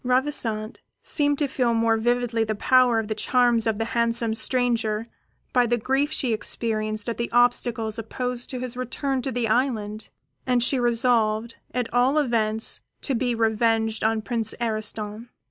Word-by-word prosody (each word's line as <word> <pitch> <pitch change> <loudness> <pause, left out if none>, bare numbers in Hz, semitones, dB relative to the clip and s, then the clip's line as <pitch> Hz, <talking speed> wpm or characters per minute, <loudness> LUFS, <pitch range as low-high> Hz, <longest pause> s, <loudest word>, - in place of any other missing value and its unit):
Ravissante 250 -4 -1 0.2
seemed 290 -1 +1
to 290 - 0
feel 245 -3 0
more 225 0 +2
vividly 240 0 0
the 215 -1 -2
power 250 +2 +4
of 225 -1 -1
the 215 - -1
charms 240 +1 +2
of 220 -2 0
the 225 - -1
handsome 235 -1 0
stranger 230 -2 0 0.5
by 245 -1 +3
the 240 +1 +1
grief 270 +5 0
which 310 - -2
she 245 -4 0
experienced 215 -1 -1
at 235 - -3
the 235 - -2
obstacles 235 -2 +1
opposed 245 +2 -4
to 255 - -3
his 250 -1 -4
return 255 +2 -2
to 265 - -3
the 240 -1 -1
island; 220 -3 -1 0.3
and 250 -2 +2
she 260 +1 +3
resolved, 230 -2 +1
at 250 -1 -2
all 250 +4 +3
events, 225 -6 +1 0.2
to 275 - -1
be 245 0 0
revenged 225 0 +1
on 220 0 +1
Prince 225 +1 -1
Ariston. 215 0 -2
235 Hz, 165 wpm, -24 LUFS, 220-250 Hz, 0.5 s, power